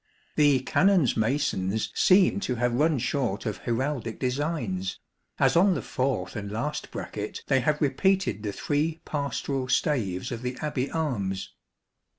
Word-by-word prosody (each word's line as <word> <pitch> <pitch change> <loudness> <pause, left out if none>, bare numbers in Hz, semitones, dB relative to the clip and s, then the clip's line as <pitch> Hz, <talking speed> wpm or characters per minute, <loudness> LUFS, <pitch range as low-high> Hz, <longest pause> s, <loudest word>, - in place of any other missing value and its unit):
The 145 -4 +4
Canons' 180 0 +3
masons 110 -4 0
seem 190 +1 +4
to 130 -11 -2
have 120 0 0
run 150 +4 +3
short 125 -4 -1
of 105 -3 -2
heraldic 120 -1 -2
designs, 125 - -2 0.4
as - - +3
on 185 +2 +5
the - - -2
fourth 130 0 -2
and 100 -2 -5
last 150 +8 -3
bracket 105 0 -6
they 135 -1 +3
have 150 +4 +1
repeated 190 - +1
the 105 -1 -3
three 150 +9 -1
pastoral 140 -2 -2
staves; 115 - 0
of 120 -1 -4
the 125 0 -4
Abbey 145 -3 -2
arms. 105 -12 -2
130 Hz, 145 wpm, -27 LUFS, 115-150 Hz, 0.4 s, on